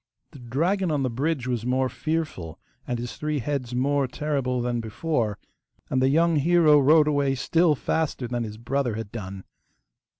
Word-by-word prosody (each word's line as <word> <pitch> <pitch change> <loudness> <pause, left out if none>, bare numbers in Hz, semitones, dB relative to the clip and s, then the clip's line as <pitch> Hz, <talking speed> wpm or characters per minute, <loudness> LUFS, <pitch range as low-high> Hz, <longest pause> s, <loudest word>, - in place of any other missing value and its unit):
The 140 - -13
dragon 170 - 0
on 145 -3 0
the 130 - -1
bridge 140 +2 -1
was 120 -3 -2
more 130 +2 +1
fearful 130 - -3 0.3
and 125 - -1
his 120 +1 -6
three 150 0 -2
heads 125 -2 -3
more 140 +2 +1
terrible 130 -2 -2
than 120 -1 -1
before, 110 -1 -2 0.5
and 130 - +2
the 130 - +4
young 165 +2 +3
hero 155 0 +5
rode 150 +2 +5
away 140 -2 +1
still 165 +5 +2
faster 145 -3 -2
than 120 0 -2
his 105 -1 -7
brother 125 0 -1
had 110 -2 -6
done. 95 -4 -7
130 Hz, 170 wpm, -25 LUFS, 120-150 Hz, 0.5 s, hero